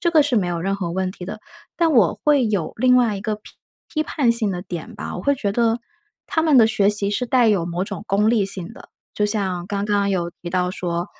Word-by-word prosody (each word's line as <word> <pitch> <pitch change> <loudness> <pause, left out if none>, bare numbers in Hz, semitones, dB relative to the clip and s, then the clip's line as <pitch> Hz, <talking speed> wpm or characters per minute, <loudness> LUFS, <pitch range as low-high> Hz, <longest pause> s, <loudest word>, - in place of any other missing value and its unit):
这 340 - +1
个 315 -3 +5
是 275 -5 0
没 190 -4 +2
有 170 -1 -2
任 195 +2 -1
何 180 -4 -3
问 185 +1 -1
题 180 - -9
的。 210 +3 -7 0.4
但 335 -1 +3
我 205 -10 +4
会 285 -5 +3
有 195 -7 -2
另 250 +2 +4
外 240 -4 +3
一 195 - -7
个 215 -1 -2
批 210 - -16 0.4
批 310 - 0
判 280 -5 +1
性 230 -3 +1
的 180 -2 -3
点 180 -3 -7
吧， - - -6
我 180 - -6
会 280 - +2
觉 210 -6 -2
得， 230 +2 +1 0.5
他 320 - 0
们 305 -5 +5
的 225 - +7
学 210 -2 +2
习 205 -1 +1
是 250 +5 -1
带 245 -2 +3
有 195 -5 +2
某 175 +1 -3
种 205 - -7
功 205 +2 +2
利 225 -3 +3
性 195 0 -4
的。 275 - -15 0.2
就 210 - +1
像 195 -4 0
刚 200 0 -2
刚 200 -1 +1
有 175 -3 -1
提 175 - -5
到 180 0 0
说， 175 -1 -3
205 Hz, 275 characters per minute, -21 LUFS, 185-235 Hz, 0.5 s, 的